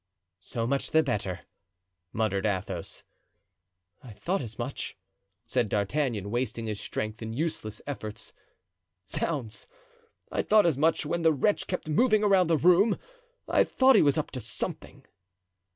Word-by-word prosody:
"So 115 +5 -4
much 140 +3 0
the 160 +1 +4
better," 100 -9 -2 0.7
muttered 105 -3 0
Athos. 95 -4 -3 1.0
"I 120 -4 -11
thought 185 - -2
as 115 -3 -7
much," 125 +3 -5 0.5
said 115 -1 0
D'Artagnan, 105 -1 -1
wasting 120 -1 -2
his 105 -2 -3
strength 110 +1 -4
in 110 0 -5
useless 115 -7 -3
efforts. 110 -7 -6 0.7
"Zounds, 130 -10 -3 0.6
I - - +1
thought 210 -2 +4
as 165 -4 +3
much 160 0 +2
when 170 +3 -1
the 165 -1 +5
wretch 175 +9 +1
kept 180 -3 -3
moving 215 +7 +3
around 195 -4 +4
the 165 -1 +3
room. 180 +7 +4 0.5
I - - +4
thought 260 0 +4
he - - +7
was 145 +1 +3
up 155 - -2
to 130 - -4
something." 115 0 -4
130 Hz, 145 wpm, -28 LUFS, 110-165 Hz, 1.0 s, he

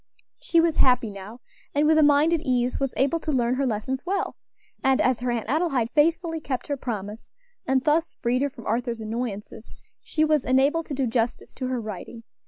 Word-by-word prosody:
She 335 - +2
was 330 -1 +2
happy 250 -4 +3
now, 200 +5 -10 0.3
and 295 +1 +3
with 315 +1 +5
a - - +6
mind 295 +2 +4
at 330 - +1
ease, 250 -4 0
was 270 -2 -1
able 280 +5 +2
to 315 - -3
learn 245 -3 +1
her 270 +1 0
lessons 250 +4 -2
well; 390 +2 -2 0.5
and 265 0 +3
as 255 -2 +2
her 245 0 -2
Aunt 235 -2 -1
Adelaide 275 -5 0
faithfully 325 +2 +2
kept 260 -5 -4
her 285 - -2
promise, 215 -4 -6 0.4
and 260 0 +2
thus 315 +3 +1
freed 250 +1 0
her 285 - +1
from 235 -4 -13
Arthur's 235 +1 -1
annoyances, 220 -1 -5 0.3
she 310 -1 0
was 305 -3 +2
enabled 280 +6 +2
to 285 - -4
do 270 0 0
justice 230 0 -2
to 255 - -4
her 255 -1 -1
writing. 220 +2 -7
260 Hz, 200 wpm, -25 LUFS, 235-300 Hz, 0.5 s, a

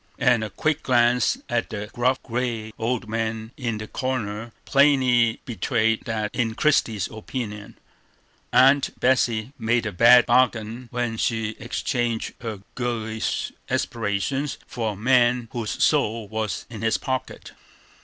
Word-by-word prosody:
And 125 -4 +3
a 110 - -4
quick 155 +7 -1
glance 120 -1 +3
at 120 -1 -1
the 105 -1 -5
gruff, 125 +2 +1
gray 115 -3 -3
old 115 0 -1
man 110 0 -3
in 115 -5 -3
the 110 0 -6
corner 115 -4 -3
plainly 130 -5 +3
betrayed 115 0 0
that, 110 -2 -2
in 115 -3 -1
Christie's 115 - +2
opinion, 110 -2 -6 0.7
Aunt 135 +3 +4
Betsey 125 -1 +1
made 115 +1 +1
a 105 - -2
bad 120 +6 +7
bargain 120 -1 +1
when 120 -2 -2
she 110 -1 0
exchanged 120 -1 -2
her 110 -4 -6
girlish 110 -3 -2 0.2
aspirations 115 +6 -1
for 110 -3 -3
a - - -10
man 120 +1 +2
whose 115 -3 -3
soul 110 0 +2
was 110 0 -3
in 110 -4 -9
his 115 0 +2
pocket. 130 -1 -4
115 Hz, 135 wpm, -24 LUFS, 110-125 Hz, 0.7 s, bad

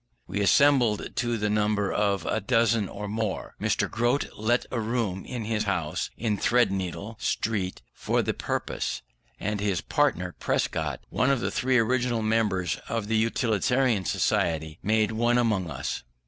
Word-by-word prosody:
We 100 +3 -2
assembled 120 0 +3
to 120 -1 0
the 105 0 0
number 105 -1 +1
of 100 -2 +1
a 110 - 0
dozen 115 -2 +2
or 105 +1 -6
more. 110 -1 -3
Mr. - - +1
Grote 120 +5 0
lent 120 +3 +1
a 120 - -1
room 110 -4 -2
of 125 -2 -4
his 110 -1 -1
house 85 -6 -1
in 105 -3 -1
Threadneedle 100 -2 0
Street 100 -5 -1
for - - 0
the - - 0
purpose, - - -3 0.4
and 105 +1 -2
his 100 -4 0
partner, - - 0
Prescott, 75 -4 -1
one 130 - +1
of 135 -2 +3
the - - -2
three 130 0 +2
original 120 0 +1
members 105 -5 +1
of 115 -2 -2
the 110 - +2
Utilitarian 115 0 +1
Society, 80 -3 0
made 110 +1 +2
one 120 +2 +2
among 105 -8 +1
us. 70 - -4
110 Hz, 155 wpm, -27 LUFS, 100-120 Hz, 0.4 s, assembled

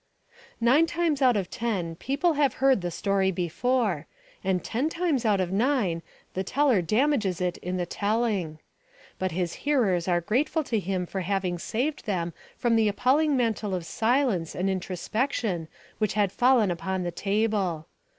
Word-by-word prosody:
Nine 260 +8 +4
times 330 -4 0
out 250 -4 +5
of 190 -3 -3
ten 210 -9 -2
the - - -9
people 280 - 0
have 285 -4 +2
heard 265 -6 +3
the 175 - -2
story 195 +2 +1
before; 185 - 0 0.4
and 185 -1 0
ten 260 +7 -1
times 320 -8 0
out 205 -3 +3
of 185 -1 -1
nine 205 -6 +1 0.3
the 190 - -2
teller 255 -1 +2
damages 215 - +1
it 180 -1 -1
in 180 +1 -3
the 175 - -1
telling. 205 -5 -1 0.6
But 185 -1 -1
his 175 -1 -1
hearers 215 - +1
are 175 -1 +3
grateful 260 - 0
to 230 -5 -1
him 185 -1 -2
for 190 +2 -4
having 185 -1 -1
saved 255 - -2
them 175 -4 -1 0.2
from 235 -2 +2
the 220 -1 +3
appalling 275 +8 +2
mantle 220 -5 0
of 175 -2 -4
silence 225 - 0
and 190 +2 0
introspection 190 - -2 0.3
which 215 -3 +1
had 205 -3 +2
fallen 245 -5 +3
upon 185 +2 -2
the 175 - -2
table. 200 -4 0
205 Hz, 165 wpm, -26 LUFS, 180-255 Hz, 0.6 s, out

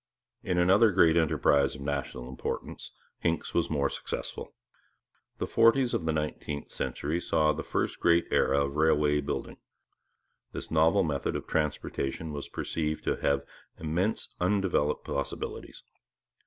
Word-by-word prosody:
In 90 -1 -1
another 95 +5 +5
great 85 -3 +5
enterprise 70 -4 +3
of 70 - -10
national 70 -3 -3
importance 65 0 -5 0.3
Hincks 85 0 -1
was 85 - +1
more 70 -3 +1
successful. - - -5 0.8
The - - -2
forties 120 +2 +4
of 80 - -1
the - - +3
nineteenth 75 -1 -4
century 80 +4 -2
saw 75 -2 +2
the - - -4
first - - -2
great 85 0 +4
era 70 - +3
of 70 +1 -5
railway 75 -2 +3
building. 70 - -4 1.0
This - - -7
novel 80 +1 +4
method 75 -4 -1
of - - -4
transportation 75 0 -2
was 70 - -6
perceived 80 -1 -3
to - - 0
have 70 0 +1 0.3
immense 85 +7 -1
undeveloped 90 -5 +1
possibilities. 70 -1 -5
80 Hz, 135 wpm, -29 LUFS, 70-85 Hz, 1.0 s, another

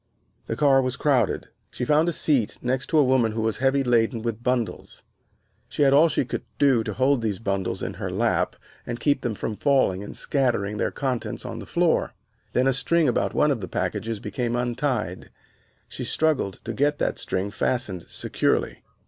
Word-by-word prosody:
The - - -2
car 140 -3 +4
was 130 0 -2
crowded. 130 -8 +1 0.2
She 125 - -3
found 155 +5 +3
a - - 0
seat 140 -8 0
next 130 +2 -1
to 160 - +1
a 150 - +6
woman 125 -4 +2
who 110 - -2
was 110 -1 0
heavily 135 +1 +2
laden 115 -2 +1
with 115 -1 -3
bundles. 125 -2 -2 0.7
She - - 0
had 135 -1 +5
all 155 +4 +6
she 135 - 0
could - - -4 0.2
do 135 -5 +4
to - - -4
hold 130 0 +2
those 105 -4 -1
bundles 100 -3 -2
in - - -3
her - - -2
lap - - 0 0.3
and 120 0 -5
keep 145 -3 +1
them 120 -3 -2
from 105 +1 -4
falling 130 -10 +2
and 105 - -9
scattering 115 -7 0
their - - +1
contents 130 -4 -3
on - - -5
the - - -9
floor. - - +1 0.4
Then 125 - +2
a 135 - +3
string 165 +4 +2
about 125 - 0
one 150 - +3
of 125 -6 -1
the 95 - -4
packages 100 +5 -2
became 120 +4 -2
untied. 120 - -2 0.6
She - - -6
struggled 150 - +1
to 115 - -4
get 145 +4 +1
that - - -1
string 95 +2 -2
fastened 105 -6 -2
securely. - - -1
125 Hz, 190 wpm, -24 LUFS, 110-140 Hz, 0.7 s, a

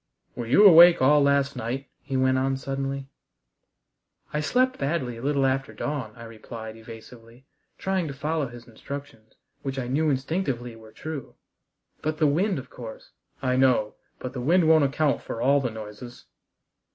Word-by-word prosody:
"Were 120 - -5
you 195 - +6
awake 175 -2 +9
all 145 +3 +5
last 140 0 +2
night?" 125 +3 -4
he 135 - -3
went 130 0 +2
on 135 0 0
suddenly. 135 0 -4 1.3
"I 150 - 0
slept 255 +11 +1
badly 140 -5 -2
a - - -9
little 140 0 +1
after 135 0 -1
dawn," 135 -8 -4
I 115 - -11
replied 110 0 -9
evasively, 115 +2 -13 0.3
trying 190 -3 -1
to 140 - -5
follow 150 +1 -1
his 120 0 -12
instructions, 115 -1 -9 0.3
which 135 -1 -4
I 125 -2 -3
knew 150 +5 +1
instinctively 135 -4 -2
were 110 -1 -15
true, 155 +2 -7 0.7
"but 155 0 -2
the 155 - +2
wind, 180 +7 +2
of 130 -1 -8
course 115 -3 -10 0.2
" - - -37
"I 125 -1 +1
know. 125 -5 +3 0.2
But 125 - -7
the 125 - -4
wind 165 +5 +3
won't 160 -2 +6
account 145 +1 +1
for 115 - -6
all 140 +3 +3
the 125 - -1
noises." 110 +2 -10
135 Hz, 170 wpm, -25 LUFS, 120-150 Hz, 1.3 s, awake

